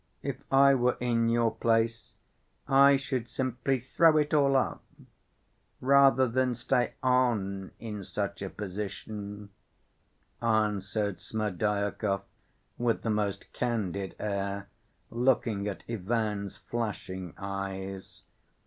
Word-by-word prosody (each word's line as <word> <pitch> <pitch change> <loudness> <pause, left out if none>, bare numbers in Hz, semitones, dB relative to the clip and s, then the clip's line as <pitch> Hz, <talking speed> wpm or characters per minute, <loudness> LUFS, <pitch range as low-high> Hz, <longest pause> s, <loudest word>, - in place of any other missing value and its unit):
If - - -4
I 140 +1 +7
were 125 -1 +2
in 115 -2 +1
your 115 -1 +3
place 115 +1 0 0.5
I 140 +1 +7
should 130 -3 -3
simply 130 +2 -1
throw 155 +6 +4
it 150 0 +1
all 140 -2 +4
up... 130 - 0 1.0
rather 135 0 +5
than 125 +1 +1
stay 125 +1 0
on 110 -7 +1
in 105 -3 -6
such 100 0 -4
a 95 - -3
position," 105 +1 -6 0.9
answered 105 -2 0
Smerdyakov, 105 -1 -1 0.6
with 120 -1 +1
the 115 - 0
most 105 -2 -2
candid 100 -5 -2
air 100 -1 -3 0.4
looking 115 -4 +1
at 100 - -5
Ivan's 105 -2 -2
flashing 95 -6 -4
eyes. 95 -1 -5
110 Hz, 105 wpm, -29 LUFS, 100-125 Hz, 1.0 s, I